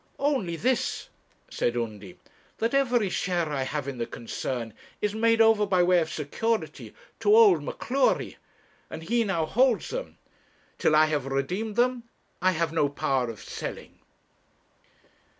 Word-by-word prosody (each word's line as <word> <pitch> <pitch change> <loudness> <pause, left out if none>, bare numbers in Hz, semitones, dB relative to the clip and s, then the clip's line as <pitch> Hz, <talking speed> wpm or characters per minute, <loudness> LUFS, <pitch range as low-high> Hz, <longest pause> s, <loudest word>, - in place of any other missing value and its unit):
'Only 260 - 0
this,' 250 +8 -1 0.4
said 120 0 -1
Undy, 105 -5 -5 0.4
'that 230 +3 -1
every 245 -6 +2
share 175 -3 -1
I 135 - -1
have 140 +1 -3
in 135 -3 -5
the 115 - -2
concern 115 -1 -5 0.3
is 210 0 -1
made 230 +1 +2
over 220 -2 +5
by 185 -2 +3
way 180 0 +4
of 160 -1 -2
security 220 +11 -3 0.2
to 415 - +4
old 430 -5 +6
M'Cleury, 270 +1 0 0.5
and 160 - -7
he 235 +7 +1
now 180 -7 0
holds 245 +7 +2
them. - - -6 0.6
Till 155 - +3
I 155 +1 +6
have 150 -3 -2
redeemed 180 +11 -2
them, 240 -1 0 0.3
I 185 +1 +3
have 165 -1 -1
no 150 -3 +2
power 135 -3 -1
of 115 - -9
selling.' - - -7
180 Hz, 150 wpm, -26 LUFS, 145-230 Hz, 0.6 s, old